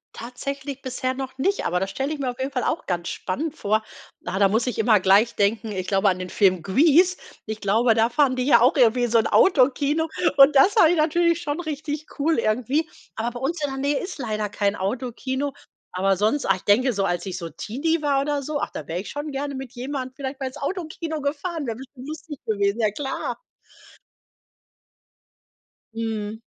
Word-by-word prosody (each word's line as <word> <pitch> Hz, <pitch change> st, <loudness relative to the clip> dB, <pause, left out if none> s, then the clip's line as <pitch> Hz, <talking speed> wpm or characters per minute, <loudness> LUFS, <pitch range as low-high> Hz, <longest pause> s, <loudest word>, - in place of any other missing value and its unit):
Tatsächlich 275 Hz, +3 st, -6 dB
bisher 255 Hz, 0 st, -2 dB
noch 260 Hz, 0 st, -6 dB
nicht, 390 Hz, +9 st, 0 dB
aber 180 Hz, -, +1 dB
das 190 Hz, +1 st, -3 dB
stelle 270 Hz, +8 st, -2 dB
ich 300 Hz, -, -6 dB
mir 260 Hz, -3 st, -1 dB
auf 245 Hz, -, -15 dB
jeden 265 Hz, +1 st, -2 dB
Fall 250 Hz, -3 st, -2 dB
auch -, -, -2 dB
ganz 175 Hz, -2 st, -2 dB
spannend 295 Hz, -, -3 dB
vor. 215 Hz, -2 st, 0 dB, 0.4 s
Ah, 185 Hz, +2 st, -2 dB
da 200 Hz, -, +6 dB
muss 225 Hz, +3 st, +1 dB
ich 250 Hz, -, -3 dB
immer 220 Hz, -2 st, +4 dB
gleich 195 Hz, +5 st, +4 dB
denken, 215 Hz, +2 st, 0 dB
ich 185 Hz, -2 st, -3 dB
glaube 195 Hz, 0 st, +3 dB
an 185 Hz, -, 0 dB
den 185 Hz, 0 st, -6 dB
Film 185 Hz, -4 st, +2 dB
Grease. 320 Hz, -, +4 dB, 0.3 s
Ich 220 Hz, 0 st, -6 dB
glaube, 225 Hz, +4 st, +3 dB
da 225 Hz, +1 st, +2 dB
fahren 270 Hz, 0 st, +2 dB
die 255 Hz, -, -1 dB
ja 250 Hz, -4 st, +6 dB
auch 250 Hz, +3 st, +4 dB
irgendwie 245 Hz, -2 st, +4 dB
in 240 Hz, -, 0 dB
so 230 Hz, -, +5 dB
'n 220 Hz, -, +1 dB
Autokino 295 Hz, 0 st, +3 dB, 0.3 s
und 275 Hz, +1 st, +7 dB
das 370 Hz, +9 st, +6 dB
fand 370 Hz, -8 st, +6 dB
ich 350 Hz, -, +1 dB
natürlich 335 Hz, +2 st, +2 dB
schon 295 Hz, -1 st, -3 dB
richtig 305 Hz, -2 st, -4 dB
cool 310 Hz, +1 st, +1 dB
irgendwie. 255 Hz, +9 st, 0 dB, 0.3 s
Aber 230 Hz, +2 st, -2 dB
bei 245 Hz, -, -7 dB
uns 305 Hz, +5 st, -2 dB
in 290 Hz, -, 0 dB
der 270 Hz, -, -5 dB
Nähe 285 Hz, +1 st, +1 dB
ist 370 Hz, -, -6 dB
leider 215 Hz, -5 st, -2 dB
kein 200 Hz, 0 st, 0 dB
Autokino. 260 Hz, +6 st, -3 dB, 0.4 s
Aber 195 Hz, +1 st, +1 dB
sonst, 220 Hz, +9 st, +1 dB
ach, 195 Hz, -, +3 dB
ich -, -, -14 dB
denke 245 Hz, +5 st, +3 dB
so, 200 Hz, -2 st, 0 dB
als 175 Hz, -2 st, -1 dB
ich 190 Hz, -2 st, -4 dB
so 170 Hz, -2 st, -6 dB
Teenie 285 Hz, -, -2 dB
war 280 Hz, -2 st, +2 dB
oder 285 Hz, 0 st, -1 dB
so, 295 Hz, +1 st, -3 dB
ach, -, -, -2 dB
da 150 Hz, -, -7 dB
wäre 170 Hz, +2 st, -3 dB
ich 190 Hz, -, -7 dB
schon 290 Hz, +1 st, -5 dB
gerne 280 Hz, +1 st, -3 dB
mit 265 Hz, -1 st, -7 dB
jemandem 260 Hz, 0 st, -5 dB
vielleicht 270 Hz, -1 st, -5 dB
mal 270 Hz, -, -3 dB
ins 260 Hz, -, -8 dB
Autokino 320 Hz, 0 st, -4 dB
gefahren, 295 Hz, +3 st, -3 dB
wäre 230 Hz, -2 st, -4 dB
bestimmt 265 Hz, 0 st, -11 dB
lustig 310 Hz, -1 st, -7 dB
gewesen, 200 Hz, 0 st, 0 dB
ja 215 Hz, -2 st, +2 dB
klar. 270 Hz, +4 st, -4 dB, 2.6 s
Mhm. 220 Hz, -1 st, -3 dB
255 Hz, 210 wpm, -23 LUFS, 215-290 Hz, 2.6 s, und